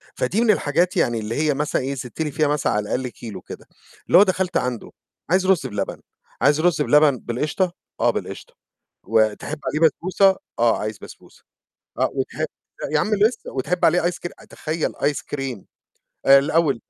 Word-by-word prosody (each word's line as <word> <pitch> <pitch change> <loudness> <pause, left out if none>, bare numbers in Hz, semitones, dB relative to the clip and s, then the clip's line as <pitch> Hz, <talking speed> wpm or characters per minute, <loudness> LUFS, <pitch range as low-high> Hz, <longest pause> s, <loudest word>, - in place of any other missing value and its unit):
فدي 195 - 0
من 225 -3 +5
الحاجات 175 +1 +1
يعني 120 -1 +1
اللي 110 +1 -4
هي 150 -1 +1
مثلًا 150 0 -1
إيه؟ 135 +2 -3
زدت 125 +3 -6
لي 150 -2 -1
فيها 150 +1 +1
مثلًا 145 -6 0
على 105 - +1
الأقل 125 +5 -2
كيلو 110 -6 -9
كده. - - -11 0.4
اللي - - +6
هو 200 - +9
دخلت 185 -2 0
عنده، 125 -3 -3 0.4
"عايز 185 +1 +3
رز 190 -4 +3
بلبن." 100 -2 -4 0.4
"عايز 145 +3 +4
رز 170 -4 +2
بلبن 150 -2 +4
بالقشطة؟" 150 +9 -1 0.3
"آه - - +3
بالقشطة." - - -6 0.5
"وتحب 110 +7 0
عليه 155 - -1
بسبوسة؟" 190 +3 +2 0.2
"آه 115 -1 +3
عايز 105 -2 -4
بسبوسة." - - -14 0.6
أ - - +3
وتحب - - -2 0.5
يا - - +5
عم 210 +5 +1
لسّه، 215 +4 0
وتحب 175 +7 -1
عليه 170 +1 +4
ice 175 0 0
cre - - -11
تخيّل! 155 +1 -3
ice 145 -1 0 0.2
cream! 135 -8 -4 0.6
آآ 135 0 +8
الأوّل 145 -3 +1
150 Hz, 175 wpm, -22 LUFS, 125-175 Hz, 0.6 s, هو